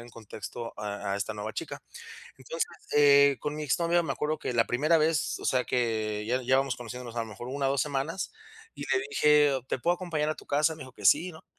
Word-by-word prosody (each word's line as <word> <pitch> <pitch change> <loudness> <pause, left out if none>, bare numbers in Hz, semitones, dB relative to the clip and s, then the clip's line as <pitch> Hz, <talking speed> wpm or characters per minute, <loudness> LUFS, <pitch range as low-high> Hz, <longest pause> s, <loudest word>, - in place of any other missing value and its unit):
en 120 - -11
contexto 115 +1 -8
a 100 -1 -3
a - - 0
esta 100 +2 -3
nueva 105 +1 -5
chica. - - -6 0.6
Entonces, 150 +6 -2 0.3
eh, 140 -1 +6
con 150 0 -3
mi 155 - -4
exnovia 170 +4 +2
me 165 - -2
acuerdo 155 +1 -2
que - - -3
la 115 -1 +3
primera 155 +7 +3
vez, 155 0 +1
o - - -9
sea, 125 -1 +2
que 110 -3 -1
ya 125 +2 0
ya 130 +2 +3
vamos 135 -2 0
conociéndonos 120 0 -8
a - - 0
lo 115 - -3
mejor 110 +3 -8
1 135 +1 -1
o - - +1
2 140 - +1
semanas, 150 +5 -3 0.4
y - - -7
le 380 - +1
dije: 150 - +4
"¿Te - - -1
puedo 170 +8 +2
acompañar 165 -4 -2
a - - -1
tu - - -13
casa?" 150 +3 +2
Me 155 - -9
dijo 130 - -12
que 105 -5 -3
sí, 170 - +4
¿no? 160 - -14
135 Hz, 240 wpm, -28 LUFS, 115-150 Hz, 0.6 s, eh